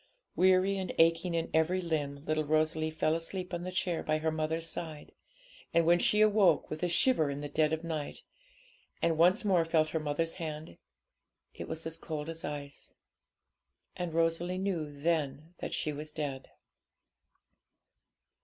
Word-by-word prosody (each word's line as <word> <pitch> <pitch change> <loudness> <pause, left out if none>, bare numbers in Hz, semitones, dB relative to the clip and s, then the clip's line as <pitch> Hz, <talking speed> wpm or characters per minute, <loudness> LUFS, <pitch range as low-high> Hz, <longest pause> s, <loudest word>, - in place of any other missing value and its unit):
Weary 185 +1 +4
and 190 - -3
aching 165 +1 +3
in 165 - -2
every 160 +4 +2
limb, 150 -4 -3
little 155 0 +1
Rosalie 155 +1 +1
fell 155 0 0
asleep 180 +3 -4
on 175 - -2
the 185 +1 -4
chair 185 -2 -1
by 155 0 0
her 160 +1 0
mother's 160 +1 -2
side; 160 -2 -7 0.6
and 170 -1 +5
when 175 +1 +5
she 210 +3 +3
awoke 205 -6 +4
with 155 - -4
a 180 - +1
shiver 170 - +3
in 140 +1 -4
the 145 - -4
dead 155 +1 +1
of 160 +1 -2
night, 155 -3 -4 0.8
and 165 -1 +2
once 180 +7 +4
more 185 -4 +4
felt 160 -1 +2
her 160 - -1
mother's 155 +2 -1
hand, 155 - -6 0.7
it - - -7
was 160 0 -5
as 160 0 -4
cold 155 -1 -5
as 165 0 -6
ice. 145 -1 -7 1.0
And 175 -2 -3
Rosalie 165 +2 0
knew 180 -6 -2
then 155 +1 -2
that - - -4
she 150 - -1
was 150 +1 -7
dead. 145 -4 -4
160 Hz, 165 wpm, -31 LUFS, 155-175 Hz, 1.0 s, and